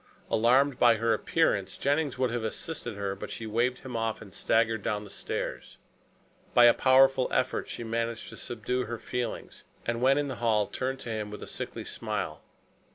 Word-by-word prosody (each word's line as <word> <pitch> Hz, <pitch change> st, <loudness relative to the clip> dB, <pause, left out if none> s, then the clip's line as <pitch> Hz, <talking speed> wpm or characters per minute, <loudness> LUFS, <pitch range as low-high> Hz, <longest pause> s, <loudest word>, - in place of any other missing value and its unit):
Alarmed 125 Hz, +4 st, +4 dB
by 120 Hz, -1 st, +6 dB
her 115 Hz, +1 st, +2 dB
appearance, 110 Hz, -, +1 dB
Jennings 145 Hz, -1 st, 0 dB
would 130 Hz, -2 st, +1 dB
have 120 Hz, -1 st, -2 dB
assisted 120 Hz, +1 st, -4 dB
her, 100 Hz, -1 st, -2 dB
but 100 Hz, -, -7 dB
she 115 Hz, -, -6 dB
waved 120 Hz, +4 st, 0 dB
him 130 Hz, -2 st, -7 dB
off 115 Hz, -1 st, -1 dB
and 100 Hz, -4 st, -12 dB
staggered 115 Hz, -1 st, +1 dB
down 105 Hz, 0 st, -2 dB
the 100 Hz, -, -11 dB
stairs. -, -, -5 dB, 0.8 s
By 120 Hz, -, +8 dB
a 120 Hz, -, +8 dB
powerful 135 Hz, 0 st, +5 dB
effort 130 Hz, -, 0 dB
she -, -, -5 dB
managed 115 Hz, 0 st, -2 dB
to -, -, -10 dB
subdue 125 Hz, +2 st, -2 dB
her 120 Hz, -, -4 dB
feelings, 120 Hz, 0 st, -5 dB, 0.2 s
and 120 Hz, 0 st, -1 dB
when 135 Hz, +2 st, +5 dB
in 145 Hz, 0 st, 0 dB
the 130 Hz, -3 st, -5 dB
hall 110 Hz, -3 st, +3 dB
turned 130 Hz, +4 st, -3 dB
to -, -, -6 dB
him 110 Hz, -2 st, -3 dB
with 105 Hz, -, -8 dB
a -, -, -8 dB
sickly -, -, -5 dB
smile. -, -, -4 dB
120 Hz, 190 wpm, -29 LUFS, 110-130 Hz, 0.8 s, By